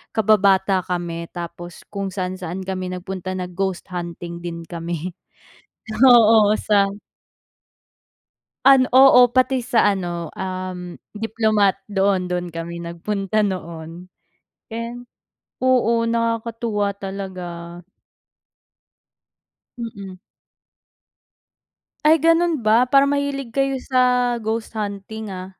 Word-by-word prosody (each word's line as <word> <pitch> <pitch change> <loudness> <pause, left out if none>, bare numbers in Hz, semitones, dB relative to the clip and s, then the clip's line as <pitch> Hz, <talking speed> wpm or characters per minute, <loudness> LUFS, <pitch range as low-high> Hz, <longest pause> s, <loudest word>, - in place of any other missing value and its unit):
kababata 195 -3 +3
kami 170 -2 -4
tapos 175 0 -8
kung 200 -1 -3
saan-saan 185 -1 -4
kami 185 -1 -4
nag-punta 185 0 -5
na 180 - -3
ghost 190 0 -3
hunting 170 -1 -6
din 170 -1 -6
kami. 170 +1 -5 0.9
Oo 225 -4 +7
sa 205 -2 +3 1.8
An 270 -2 +7
oo 260 -2 +8
pati 255 0 +3
sa 235 -3 +2
ano 175 -4 -3
um, 185 -1 -5 0.2
Diplomat 215 -3 +1
doon 195 -2 +1
doon 180 0 -2
kami 170 +1 -5
nagpunta 195 +5 -2
noon. 170 -3 -5 0.6
And, 235 +2 -6 0.5
oo, 235 -3 +2
nakakatuwa 230 -2 -1
talaga. 180 -3 -7 2.0
Mm. 200 -5 -7 1.9
Ay, 315 +2 +6
ganun 330 0 +3
ba 225 +3 +5
para 275 0 +6
mahilig 280 -4 -2
kayo 275 -1 +1
sa 250 -1 +2
ghost 220 +1 -3
hunting 210 0 -5
ah. 185 0 -7
200 Hz, 95 wpm, -21 LUFS, 180-230 Hz, 2.0 s, oo